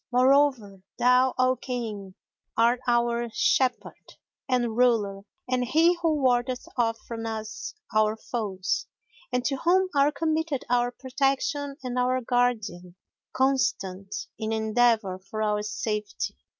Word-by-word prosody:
Moreover 255 -6 +3 0.2
thou, 250 +1 +4
O 255 0 +3
King, 215 -8 -5 0.4
art 235 +2 +4
our 235 0 +1
shepherd 255 +2 0 0.4
and 240 -3 +1
ruler 220 -5 +2 0.3
and 250 0 0
he 325 +7 +4
who 325 -2 +2
wardeth 250 0 +1
off 230 -2 +1
from 230 -1 -5
us 220 - -5 0.2
our 215 0 +2
foes, 200 -5 -3 0.4
and 250 0 -1
to 275 - 0
whom 370 +6 +2
are 280 +1 +4
committed 315 -1 -1
our 245 0 +3
protection 275 +2 -1
and 250 0 -2
our 255 +1 +2
guardian, 220 -8 -1 0.4
constant 200 -8 0 0.2
in 220 0 -2
endeavour 220 -3 +2
for 215 +3 -5
our 210 -1 +1
safety. 210 0 -3
245 Hz, 125 wpm, -26 LUFS, 215-260 Hz, 0.4 s, thou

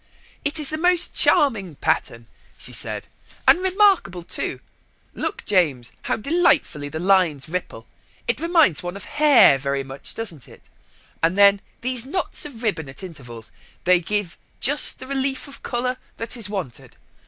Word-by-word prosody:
"It 290 +2 -1
is 300 0 +2
a 310 - -2
most 355 +1 +2
charming 205 - +2
pattern," 125 -6 -2 0.3
she - - -4
said, - - -1 0.4
"and - - +7
remarkable 375 - +2
too. - - -4 0.5
Look, 410 - -4
James, 150 - +1
how - - -2
delightfully 250 - +1
the 155 - -6
lines 175 -6 +2
ripple. 180 +3 -5 0.4
It - - 0
reminds 330 - +3
one 175 +1 -6
of 200 - -10
hair, 290 - +5
very 140 0 -2
much, 135 +1 -6
doesn't 175 - -2
it. - - -18 0.5
And 170 +4 +1
then 200 0 +6 0.2
these 255 0 +1
knots 360 +2 -3
of 250 -6 -10
ribbon 160 - -2
at 135 - -10
intervals. 120 - -10 0.3
They 180 0 +4
give 200 0 -3 0.2
just 290 +3 +4
the - - -9
relief 270 +1 -1
of 280 - -12
colour 250 +1 -2 0.2
that 230 +2 -3
is 225 -4 -1
wanted. 185 - -7
200 Hz, 155 wpm, -22 LUFS, -, 0.5 s, and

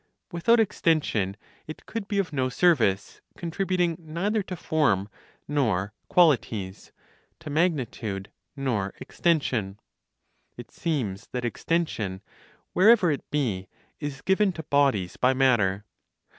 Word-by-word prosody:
Without 225 +7 +3
extension, 150 - +1 0.3
it 155 - -9
could 225 -3 -5
be 205 - -2
of 180 -6 -1
no 130 -2 0
service, 125 - +2 0.2
contributing 180 0 0
neither 175 +7 -1
to 185 -1 -6
form 140 - +1 0.4
nor 105 -9 0 0.2
qualities, 115 - +2 0.5
to 155 -2 -8
magnitude 125 - -1 0.2
nor 120 -9 -2
extension. 120 - 0 0.8
It 120 -2 -10
seems 115 - -3
that 125 -1 -2
extension, 115 - -2 0.5
wherever 195 -2 +6
it 145 - -4
be, 110 -11 -1 0.3
is 145 -2 -5
given 190 +1 +3
to 160 - -7
bodies 135 -11 +1
by 130 +1 +3
matter. 105 -7 +2
145 Hz, 115 wpm, -26 LUFS, 105-170 Hz, 0.8 s, wherever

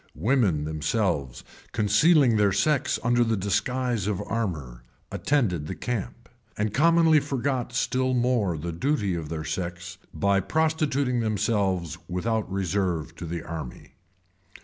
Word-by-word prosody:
Women 100 - +2
themselves, 75 - -1 0.3
concealing 125 +5 +4
their 105 -2 +3
sex 145 - +1
under 120 +1 +3
the 115 -2 0
disguise 120 +2 -1
of 105 -3 -1
armor, 80 - -3 0.3
attended 100 - 0
the 95 - -4
camp; 115 +4 -4 0.3
and 105 0 -1
commonly 165 +1 +5
forgot 135 -3 -2
still 130 0 0
more 120 -8 +1
the 85 +3 -4
duty 105 - 0
of 80 -3 -4
their 80 -1 -4
sex, 85 +2 -5
by 100 +5 +2
prostituting 140 - 0
themselves 95 -6 0
without 110 +3 -1
reserve 90 -4 -1
to 85 - -6
the 85 0 -4
army. 80 -7 -8
105 Hz, 125 wpm, -26 LUFS, 85-125 Hz, 0.3 s, commonly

